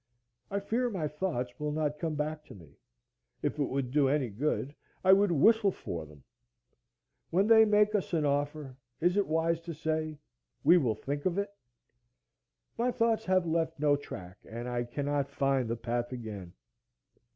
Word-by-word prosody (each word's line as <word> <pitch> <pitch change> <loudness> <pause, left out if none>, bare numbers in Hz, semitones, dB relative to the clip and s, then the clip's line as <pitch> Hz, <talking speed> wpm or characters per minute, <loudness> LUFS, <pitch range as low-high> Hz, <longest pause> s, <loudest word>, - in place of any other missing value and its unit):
I 200 - -1
fear 235 +5 0
my 180 -8 -2
thoughts 150 -6 -3
will 150 0 -2
not 150 -1 -1
come 160 -1 -2
back 150 +1 -3
to - - -12
me. 80 -7 -16 0.7
If - - -1
it 145 - +2
would 130 -2 -2
do 140 -1 +3
any 135 -3 +1
good, 140 +5 -2 0.3
I 190 0 +7
would 200 -1 +4
whistle 210 +7 +5
for 85 - -6
them. 75 -2 -16 1.1
When 190 +4 +3
they 220 0 +7
make 210 0 +4
us 205 -3 -1
an 160 -4 +1
offer, 145 -1 -1 0.2
is 175 +3 +2
it 205 -1 +2
wise 165 +1 +1
to 165 -1 -7
say, 155 0 -2 0.5
We 170 +5 +7
will 120 -8 +1
think 145 - -3
of 180 0 -1
it? 200 0 -1 1.3
My 245 +2 +2
thoughts 230 -2 +1
have 185 -1 +2
left 165 -1 -1
no 145 -1 +4
track, 90 -9 -8
and 120 +2 -5
I 120 -1 -1
cannot 140 +2 -2
find 135 -3 0
the 115 - 0
path 120 +1 -2
again. 105 -8 -7
150 Hz, 175 wpm, -30 LUFS, 130-180 Hz, 1.3 s, I